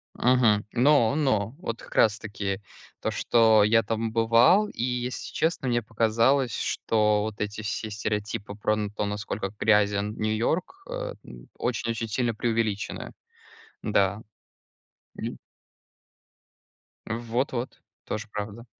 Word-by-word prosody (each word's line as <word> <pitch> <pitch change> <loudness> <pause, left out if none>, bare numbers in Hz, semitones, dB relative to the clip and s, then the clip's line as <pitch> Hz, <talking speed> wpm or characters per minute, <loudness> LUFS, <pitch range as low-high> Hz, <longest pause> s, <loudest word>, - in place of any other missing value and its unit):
Мгм, 120 -4 +3
но 130 0 +4
но 125 -6 +1
вот 115 -10 -5
как - - -13
раз 105 -2 +4
таки 100 -2 -4 0.4
то, - - 0
что 110 -3 +4
я 115 +2 +4
там 115 +1 -2
бывал. 115 - +5
И, 115 - -4
если 125 0 -3
честно, 160 -5 0
мне 120 -1 +2
показалось, 115 +3 +2
что 105 -1 +1
вот 110 -1 -5
эти 105 +1 -3
все 110 +1 -3
стереотипы 105 0 -3
про 105 +1 0
н 105 -1 -3
то, 105 0 -2
насколько 100 -1 -3
грязен 105 -1 +2
Нью-Йорк, 120 - -1
э, - - -4
н - - -12
очень 120 -1 -2
очень 115 0 -3
сильно 120 +2 0
преувеличены. 110 -3 -2 0.7
Да. 100 0 +1 0.9
Мгм. - - -5 1.7
Вот 120 +3 -1
вот, 125 0 -5 0.2
тоже 110 0 -4
правда. 105 +3 -6
110 Hz, 130 wpm, -26 LUFS, 105-120 Hz, 1.7 s, бывал